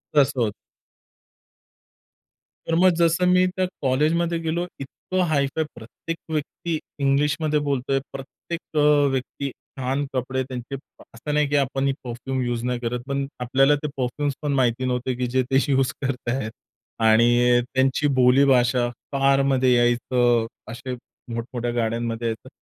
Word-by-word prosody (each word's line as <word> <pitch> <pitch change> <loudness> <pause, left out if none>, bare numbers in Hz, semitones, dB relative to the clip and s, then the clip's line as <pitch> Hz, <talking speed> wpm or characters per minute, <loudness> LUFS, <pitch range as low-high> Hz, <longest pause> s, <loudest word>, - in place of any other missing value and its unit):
तसं 135 -3 +3
होतं. 105 -3 +1 2.1
तर 165 - +1
मग 185 0 +6
जसं 170 +1 +2
मी 180 0 +5
त्या 185 0 +1 0.2
कॉलेजमध्ये 160 +6 +1
गेलो, 165 +2 -1
इतकं 185 +7 -3
हाय 140 -3 +2
फाय, 160 - +1
प्रत्येक 120 +8 -7 0.2
व्यक्ती 160 +2 -2 0.2
इंग्लिशमध्ये 150 +2 +1
बोलतोय, 135 -2 0
प्रत्येक 140 +5 -7 0.2
अ, 145 -1 +5
व्यक्ती 135 +1 -3
अ, - - -9 0.3
छान 135 +3 -1
कपडे 130 0 -1
त्यांचे 130 0 -6 0.4
असं 150 +6 -4
नाही 150 0 +2
की 145 - 0
आपण 135 0 0
ही 135 - +2
परफ्यूम 130 +2 -4
युज 120 -1 -2
नाही 125 0 -1
करत, 120 0 -2
पण 140 0 -1 0.2
आपल्याला 135 +4 +4
ते 150 - 0
परफ्यूम्स 135 +3 -1
पण 145 -2 -1
माहिती 130 -1 +1
नव्हते 125 0 -1
की 125 0 -2
जे 130 +1 +1
ते 135 - +5
युज 135 -3 +2
करतायेत. 125 -3 -2 0.5
आणि 120 +2 +5
त्यांची 135 +2 +2
बोली 125 +2 +6
भाषा, 125 -2 +3 0.2
कारमध्ये 135 -2 +3
यायचं. 120 -1 +2 0.3
असे 125 +2 -6 0.4
मोठमोठ्या 120 +1 -3
गाड्यांमध्ये 115 0 -1
यायचं. 115 +3 -5
130 Hz, 145 wpm, -23 LUFS, 120-145 Hz, 2.1 s, मग